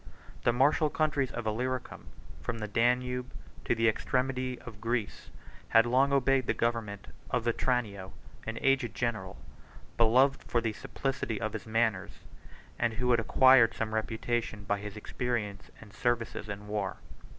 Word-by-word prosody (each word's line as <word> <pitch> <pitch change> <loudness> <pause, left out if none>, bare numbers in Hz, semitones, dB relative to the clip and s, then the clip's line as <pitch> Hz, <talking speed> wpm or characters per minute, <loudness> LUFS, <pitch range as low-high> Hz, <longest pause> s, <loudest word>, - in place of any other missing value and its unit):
The 120 - +5
martial 145 +5 +3
countries 145 -4 0
of 120 - -5
Illyricum, 125 +4 -3 0.3
from 95 - -3
the 105 -1 -4
Danube 125 +3 +1 0.3
to - - +2
the 115 0 +2
extremity 130 +2 0
of 110 -4 -11
Greece, 115 -2 -2 0.4
had 115 +1 +6
long 130 +3 +3
obeyed 135 -2 +2
the - - +1
government 115 -4 -2 0.2
of 125 -2 0
Vetranio, 115 -5 -1 0.4
an 115 0 -3
aged 135 -4 +2
general, 110 -6 -2 0.6
beloved 125 +4 +4
for 120 - 0
the 115 -2 -2
simplicity 130 -2 -3
of 110 - -3
his - - -6
manners, 110 -3 0 0.6
and 115 -1 +1
who 125 +3 0
had 120 - +4
acquired 130 0 +6
some 110 -1 -3
reputation 110 -1 -2
by 100 +1 -1
his 105 0 -7
experience 105 -3 -3
and 105 -3 -14
services 115 -2 -1
in 100 +1 -6
war. 105 -2 -2
115 Hz, 150 wpm, -30 LUFS, 110-125 Hz, 0.6 s, had